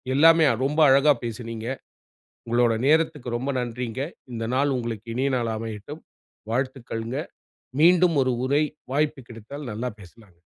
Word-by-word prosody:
எல்லாமே 165 +2 +6 0.2
ரொம்ப 150 +3 -1
அழகா 140 +2 +6
பேசுனீங்க. 115 -1 -5 0.8
உங்களோட 120 0 +3
நேரத்துக்கு 155 -4 +2
ரொம்ப 135 +3 -2
நன்றிங்க. 125 +1 -4 0.3
இந்த 115 0 -3
நாள் 140 +1 +2
உங்களுக்கு 115 -2 -5
இனிய 135 +2 0
நாள் 115 -2 -1
அமையட்டும். 110 +7 -7 0.5
வாழ்த்துக்கள்ங்க. 125 -2 -3 0.6
மீண்டும் 175 -1 +5
ஒரு 130 -1 +1
உரை 145 +3 +3 0.3
வாய்ப்பு 145 -2 0
கிடைத்தால் 120 +4 -8
நல்லா 120 +4 -3
பேசலாம்ங்க. 95 -1 -17
125 Hz, 125 wpm, -25 LUFS, 115-145 Hz, 0.8 s, எல்லாமே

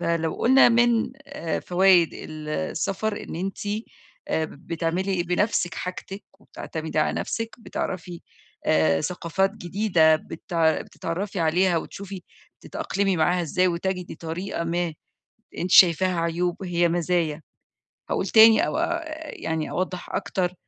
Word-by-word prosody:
فلو 165 -1 0
قلنا 260 +1 +6
من 235 0 +3
آآ، 280 - -3
فوايد 180 -2 +4
ال 155 -1 -8
السَفَر 195 +5 -2
إن - - -7
أنتِ 190 +3 -4 0.7
اا 160 - +1
بتعملي 170 +4 -2
بنفسِك 180 -1 0
حاجتِك، 190 +2 -6 0.2
وبتعتمدي 160 -5 -6
على 155 - +2
نفسِك 230 0 -4
بتعرفي 180 -6 -5 0.5
آآ، 80 0 +3
ثقافات 180 +2 0
جديدة 175 -5 +3
بتع 160 0 -1
بتتعرّفي 185 +2 -4
عليها 175 +2 +2
وتشوفي 195 +2 -6 0.4
تتأقلمي 195 -1 -1
معاها 175 +2 +2
إزاي، 180 +3 +1
وتَجِدي 180 +1 -3
طريقة 170 +2 -4
ما 170 -1 -1 0.6
أنتِ 180 - -3
شايفاها 180 0 +6
عيوب 170 +2 -1
هي 175 -1 +1
مزايا، 170 -2 0 0.7
هاقول 190 - -1
تاني 220 +1 +7
أو - - -2
آآ 340 0 -1 0.3
يعني 160 -1 -3
أوضح 185 0 -3
أكتر 180 -1 -1
180 Hz, 120 wpm, -24 LUFS, 165-195 Hz, 0.7 s, تاني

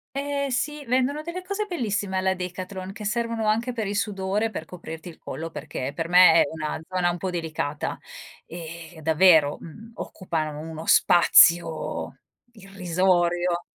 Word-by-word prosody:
Eh 280 0 -2
sì, 295 +4 -2
vendono 260 +4 0
delle 340 +3 -6
cose 400 +3 -3
bellissime 205 - -2
alla 190 0 +1
Decathlon 185 +1 -6
che 210 +1 -9
servono 230 0 -1
anche 225 +4 +1
per 230 -3 -3
il 200 +1 -3
sudore, 205 +1 -1
per 160 - -6
coprirti 165 -1 -9
il 165 - -14
collo 165 +1 -6
perché 140 -3 -5
per 165 +2 -4
me 180 -1 +8
è - - +6
una 155 0 -4
zona 180 -1 +1
un 175 - -4
po' 190 +2 -3
delicata 155 -4 -3 0.5
e, 165 0 -9
davvero, 160 -2 +5
uhm, 220 +8 -12
occupa 160 -5 -4
uno 160 +2 -7
spazio 170 -1 +4 0.4
irrisorio. 180 -3 0
185 Hz, 150 wpm, -25 LUFS, 165-220 Hz, 0.5 s, me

